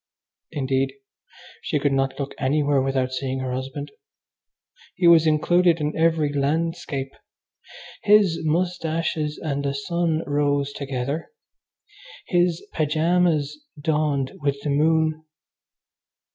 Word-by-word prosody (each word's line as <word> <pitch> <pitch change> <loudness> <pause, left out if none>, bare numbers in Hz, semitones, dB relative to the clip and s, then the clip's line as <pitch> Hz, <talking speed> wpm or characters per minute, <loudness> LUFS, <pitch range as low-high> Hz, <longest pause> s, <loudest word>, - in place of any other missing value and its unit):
Indeed, 135 -2 -1 0.7
she - - -1
could 145 0 +1
not 135 0 0
look 140 -1 -4
anywhere 140 0 +2
without 130 -1 0
seeing 130 0 -3
her 130 -1 -3
husband. 135 +3 -5 1.0
He 180 - 0
was 165 -2 +7
included 170 +2 +3
in 150 0 -2
every 160 -3 +2
landscape. 145 -1 -1 0.9
His 200 -5 +4
moustaches 160 -2 -1
and 140 -3 -3
the 140 0 -1
sun 165 +2 -1
rose 145 -1 0
together. 140 +2 -4 1.0
His 175 -2 +1
pyjamas 160 - +1 0.2
dawned 145 -3 0
with 140 -1 0
the 145 - -1
moon. 155 +1 +2
150 Hz, 105 wpm, -23 LUFS, 140-165 Hz, 1.0 s, was